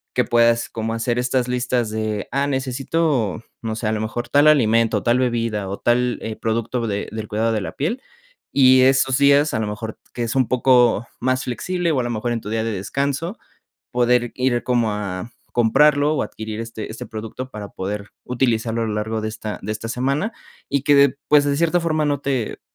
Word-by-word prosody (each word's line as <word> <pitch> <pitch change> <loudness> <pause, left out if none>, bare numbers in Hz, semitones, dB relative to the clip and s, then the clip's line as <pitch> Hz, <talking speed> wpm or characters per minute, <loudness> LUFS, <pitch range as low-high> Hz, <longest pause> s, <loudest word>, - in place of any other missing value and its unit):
que - - +3
puedas 115 0 +3
como 115 0 -3
hacer 115 +1 -1
estas 125 0 0
listas 125 -2 0
de, 110 -2 -3
ah, 140 +2 +1
necesito, 135 - -1 0.2
no 110 -1 -2
sé, 110 0 -3
a - - +1
lo 110 - -1
mejor 120 +2 -4
tal 145 +1 +4
alimento, 115 -6 +4
tal 120 +1 +3
bebida, 115 -5 -1
o 100 - -5
tal, 125 0 +1
eh, 110 -1 -4
producto 115 +2 -2
de 100 0 -2
del 110 0 -5
cuidado 110 +2 0
de 110 -2 0
la - - -5
piel. 185 - -2 0.5
Y 130 -1 +7
esos 135 0 +3
días, 140 +1 +4
a - - 0
lo 110 - -1
mejor 110 +1 -5 0.2
que 120 - -5
es 115 - -3
un 130 -3 +3
poco 125 -3 +3
más 130 +1 0
flexible, 175 +7 -1
o 140 - +1
a - - 0
lo 120 - -3
mejor 115 +2 -2
en 115 - -3
tu 105 - -7
día 110 0 -1
de 115 - -2
descanso, 140 - -2 0.6
poder 120 -1 +2
ir 125 -2 0
como 120 -3 +1
a 100 0 -4 0.2
comprarlo, 145 +6 +4
o - - +1
adquirir 110 0 -6
este 115 -1 -6
este 110 - -7
producto 115 +4 -7
para 105 -3 -7
poder 100 +2 -5
utilizarlo 115 -2 0
a 115 - -1
lo 105 - -2
largo 110 +1 -2
de 110 - -2
esta 110 -1 -6
de 105 - -3
esta 110 +1 -5
semana, 140 - -1 0.4
y 140 -1 +1
que 145 - +5
de 140 -1 +4
pues, 145 -1 +5
de 140 -1 +1
cierta 170 +2 +2
forma 155 -2 0
no 145 -2 0
te 135 -5 -2
120 Hz, 210 wpm, -21 LUFS, 110-135 Hz, 0.6 s, Y